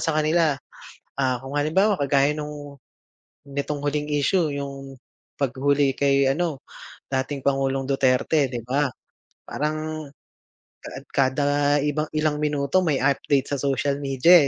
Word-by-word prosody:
sa 160 - +1
kanila. 155 0 +2 0.7
Ah, 130 -2 +1
kung 135 +2 -6
halimbawa 190 +8 +2
kagaya 140 +1 +2
nung 150 -1 -7 0.7
nitong 140 +1 -3
huling 150 +1 -1
issue, 155 +4 +2
yung 140 -1 -6 0.4
paghuli 140 +1 +2
kay 140 -1 +3
ano, 155 -1 -1 0.5
dating 135 +1 -2
Pangulong 135 -1 +1
Duterte, 135 +2 +2
'di 120 -3 -4
ba, 140 +3 +1 0.6
parang 155 0 -3 0.8
kaad - - -8
kada 135 +1 +2 0.4
iba 150 +1 0
ilang 155 -1 +1
minuto, 145 +3 +1
may 150 -5 +1
update 140 0 +1
sa 145 - 0
social 140 +1 0
media, 140 +4 +5
140 Hz, 125 wpm, -24 LUFS, 135-150 Hz, 0.8 s, media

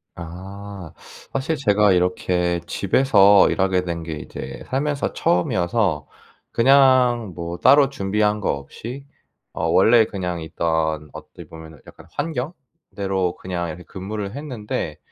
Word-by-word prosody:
아. 95 +1 -9 0.4
사실 135 +4 -1
제가 105 -6 +3
이렇게 90 -1 0
집에서 100 -2 +4
일하게 95 -1 +1
된 85 -2 -4
게 80 -1 -5
이제 75 - -8
살면서 140 +2 -1
처음이어서 90 -2 0 0.4
그냥 125 -4 +4
뭐 85 0 -5
따로 140 +6 +5
준비한 105 -3 0
거 - - -2
없이 120 - -8 0.5
어 80 - -3
원래 110 +7 +5
그냥 90 -5 -4
있던 80 -2 -1
어떻게 - - -11
보면은 80 -2 -12
약간 - - -14
환경대로 130 - -4
그냥 90 -2 -4
이렇게 85 +3 -8
근무를 100 +3 -6
했는데 110 - -5
95 Hz, 265 characters per minute, -22 LUFS, 85-120 Hz, 0.5 s, 따로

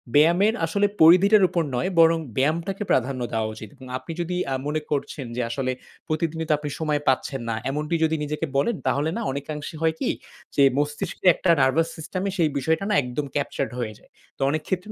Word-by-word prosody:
ব্যায়ামের 175 +8 +5
আসলে 200 +5 +1 0.2
পরিধিটার 190 +6 +7
উপর 170 - 0
নয় 175 +10 0
বরং 165 0 +6 0.2
ব্যায়ামটাকে 165 +9 0
প্রাধান্য 130 0 +1
দেওয়া 110 -1 0
উচিত। 110 0 -9
এবং 130 -2 -13
আপনি 130 +5 -9
যদি 175 +1 -3 0.2
আ - - +1
মনে 155 +1 -1
করছেন 140 -1 -2
যে 125 - -1
আসলে 130 +2 -1 0.4
প্রতিদিনই 160 +1 -1
তো - - +5
আপনি 150 0 -5
সময় 150 -2 0
পাচ্ছেন 135 0 +1
না। 115 - 0
এমনটি 150 +4 -1
যদি 160 0 +2
নিজেকে 150 +2 -2
বলেন 220 +12 +2
তাহলে 145 +3 +1
না - - -2
অনেকাংশে 145 +3 -5
হয় 160 -1 +2
কি - - 0 0.5
যে 140 - +5
মস্তিষ্কের 145 +5 -2
একটা 185 - -1
নার্ভাস 135 +5 +3
সিস্টেমে 185 +5 -3
সেই 165 -3 +3
বিষয়টা 160 +6 0
না - - +2
একদম 125 +4 -3
ক্যাপচার্ড 140 -1 -2
হয়ে 110 -3 -3
যায়। - - -25 0.3
তো - - 0
অনেক 155 +1 -2
ক্ষেত্রে 190 +2 -2
155 Hz, 195 wpm, -24 LUFS, 140-165 Hz, 0.5 s, পরিধিটার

